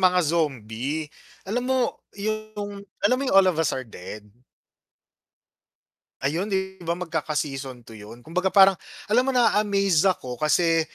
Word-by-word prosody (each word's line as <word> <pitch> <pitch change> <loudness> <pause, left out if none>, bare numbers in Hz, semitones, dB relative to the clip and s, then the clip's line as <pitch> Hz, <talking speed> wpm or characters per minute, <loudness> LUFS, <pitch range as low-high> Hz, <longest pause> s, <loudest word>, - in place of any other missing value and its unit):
mga 180 -2 +4
zombie. 145 -1 -2 0.3
Alam 225 +6 -2
mo 260 - +2 0.4
yung, 210 -1 -4 0.2
alam 250 +5 +4
mo - - -1
yung - - +3
"All 195 -1 +7
of 165 - -2
Us 155 - +1
Are 130 - -4
Dead?" 105 0 -9 2.0
Ayun 165 +8 0
'di 190 -1 -2
ba 170 0 -2
magkaka 160 -4 -3
season 135 -4 -4
2 - - -13
yun 115 +2 -11
kumbaga 180 +4 0
parang, 195 +1 +7 0.3
alam 220 +4 +3
mo 265 - +1
naa-amaze 200 -7 +3
ako 130 -8 -3
kasi 165 +2 +3
170 Hz, 150 wpm, -25 LUFS, 145-200 Hz, 2.0 s, All